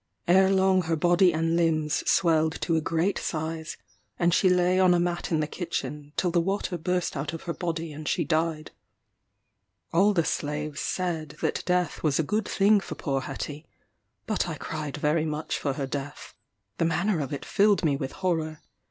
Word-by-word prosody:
Ere 190 +2 +5
long 190 -1 +3
her 165 -1 -1
body 175 +3 +4
and 165 +1 0
limbs 155 -3 +1
swelled 160 -3 +2
to 165 - 0
a 160 - +2
great 165 +5 0
size; 160 0 -4 0.4
and 175 0 +2
she 185 - +4
lay 180 0 +3
on 185 -1 +5
a - - +2
mat 175 0 -2
in 160 -2 +2
the - - +1
kitchen, 150 -3 -5
till 180 - +1
the 170 0 +3
water 195 +1 -2
burst 180 +1 -1
out 150 +3 -3
of 165 - -7
her 170 - -3
body 165 -2 -3
and 150 +1 -8
she - - +1
died. 160 -1 -1 1.2
All 195 +5 +5
the 170 -5 +1
slaves 150 0 -3
said 165 -5 -2
that - - 0
death 180 -1 0
was 150 -3 +1
a 160 - +2
good 210 +6 -1
thing 205 +1 +4
for - - -7
poor 135 -4 -2
Hetty; 145 +3 -6 0.6
but - - -1
I - - -3
cried 150 -3 -5
very 155 +2 +1
much 155 0 -3
for 140 - -1
her 135 0 -3
death. 140 +2 -6 0.5
The 165 - +2
manner 170 +3 +1
of 140 -3 -3
it 145 - -5
filled 205 -3 +3
me 145 -3 +3
with 135 -1 -4
horror. 160 -3 -1
165 Hz, 190 wpm, -27 LUFS, 155-180 Hz, 1.2 s, Ere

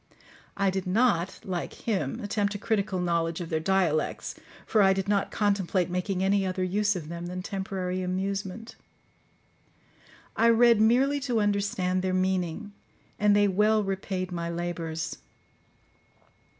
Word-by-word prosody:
I 195 -1 +2
did 190 0 -3
not, 190 -3 +1
like 180 -2 -4
him, 225 +2 -1
attempt 205 -1 -1
a - - -1
critical 200 -3 -1
knowledge 170 -2 0
of 170 -2 -5
their 160 - 0
dialects, 165 -3 0 0.3
for 215 - +3
I 195 -1 +5
did 195 0 -2
not 200 -1 +1
contemplate 195 -3 0
making 180 +1 -1
any 195 +1 +2
other 185 0 -1
use 205 +2 +1
of 165 -4 -5
them 170 +1 -6
than 180 +1 -5
temporary 190 -2 -3
amusement. 195 +3 -3 1.6
I 230 +1 +4
read 230 -1 +5
merely 260 +6 +3
to 250 -5 0
understand 200 -3 0
their 185 0 0
meaning, 185 +2 -1 0.5
and 210 0 +4
they 205 0 +4
well 210 +2 +3
repaid 190 -1 -3
my 170 -1 -3
labours. 170 -2 -4
190 Hz, 140 wpm, -27 LUFS, 180-205 Hz, 1.6 s, I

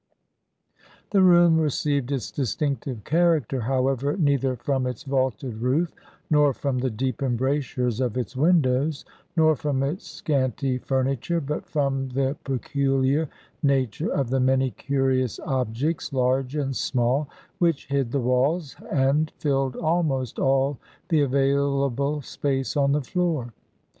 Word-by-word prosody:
The 195 - +4
room 175 -3 +6
received 145 -3 0
its 135 -3 -2
distinctive 135 -3 -2
character 160 - +2
however 135 - 0
neither 140 -6 +1
from 130 +1 -1
its 125 -3 -5
vaulted 130 -3 -1
roof, 145 +7 +1 0.3
nor 150 -2 +4
from 135 -1 -2
the 130 +1 0
deep 130 +4 -3
embrasures 130 -2 0
of 125 -2 -1
its 125 +1 -3
windows, 145 -1 +2 0.3
nor 155 -1 +5
from 140 -2 -1
its 150 +8 -3
scanty 130 -2 -1
furniture, 135 +5 -1
but 150 0 -4
from 135 -3 -1
the 135 +2 0
peculiar 135 +2 0 0.3
nature 140 +1 +1
of 135 -4 -1
the 135 - +2
many 130 0 +2
curious 130 0 0
objects, 135 +5 -2
large 130 +1 0
and 135 -3 -1
small, 130 +4 0 0.3
which 170 -5 +1
hid 135 -4 -1
the 140 - 0
walls 135 +6 +1 0.2
and 145 +2 +2
filled 135 -5 0
almost 155 -7 0
all 135 0 +2 0.3
the 160 -4 +3
available 140 +1 +1
space 135 +1 -2
on 140 -1 +3
the 145 -1 0
floor. 155 -7 -1
135 Hz, 130 wpm, -25 LUFS, 130-150 Hz, 0.3 s, room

